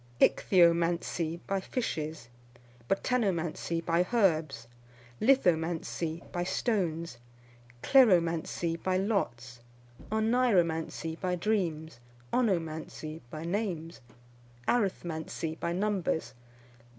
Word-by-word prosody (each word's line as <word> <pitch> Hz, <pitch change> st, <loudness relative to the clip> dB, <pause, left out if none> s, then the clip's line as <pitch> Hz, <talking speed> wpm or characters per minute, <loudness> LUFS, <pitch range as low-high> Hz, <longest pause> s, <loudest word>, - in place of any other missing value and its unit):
Ichthyomancy, 170 Hz, -1 st, +3 dB
by 195 Hz, 0 st, 0 dB
fishes. 155 Hz, -, -4 dB, 0.6 s
Botanomancy, 175 Hz, -7 st, 0 dB
by 170 Hz, +2 st, +2 dB
herbs. 160 Hz, -, +1 dB, 0.5 s
Lithomancy, 170 Hz, -7 st, +1 dB
by 175 Hz, -, -1 dB
stones. 170 Hz, -, -1 dB, 0.6 s
Kleromancy, 170 Hz, -, +3 dB
by 185 Hz, 0 st, +1 dB
lots. 125 Hz, -, -2 dB, 0.5 s
Oneiromancy, 190 Hz, -8 st, +1 dB
by 180 Hz, -2 st, -1 dB
dreams. 170 Hz, -, -1 dB, 0.3 s
Onomancy, 160 Hz, -7 st, -1 dB
by 155 Hz, +4 st, -6 dB
names. 170 Hz, -4 st, -3 dB, 0.7 s
Arithmancy, 165 Hz, -7 st, -1 dB
by 170 Hz, -, -1 dB
numbers. 190 Hz, -3 st, -1 dB
170 Hz, 75 wpm, -30 LUFS, 160-195 Hz, 0.7 s, Ichthyomancy